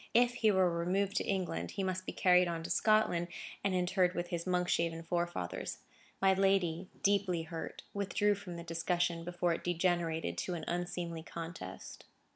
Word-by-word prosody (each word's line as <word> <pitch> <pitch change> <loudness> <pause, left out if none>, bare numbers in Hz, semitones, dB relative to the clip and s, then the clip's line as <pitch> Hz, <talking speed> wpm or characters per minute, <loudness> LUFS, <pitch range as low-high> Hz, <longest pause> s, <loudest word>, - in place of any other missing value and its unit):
If 245 +1 +5
he 225 -2 +3
were 190 -3 +4
removed 185 +4 0
to - - +2
England, 175 - -1
he 195 - 0
must 185 0 -2
be - - -1
carried 180 -1 +5
on 165 -1 -3
to - - -4
Scotland, 215 -6 +3 0.4
and 195 -2 +1
interred 180 0 +2
with 175 0 -2
his 170 0 -3
Monkshaven 170 -2 +1
forefathers. 175 +1 -2 0.4
My 195 0 +5
lady, 190 -2 +2
deeply 195 -4 +2
hurt, 160 0 -6
withdrew 205 +1 +2
from 190 -3 -7
the 170 - -6
discussion, 170 0 0
before 175 0 0
it - - -5
degenerated 170 - 0
to 180 - -2
an 165 - -5
unseemly 175 -1 -3
contest. 165 - -8
175 Hz, 165 wpm, -33 LUFS, 170-190 Hz, 0.4 s, If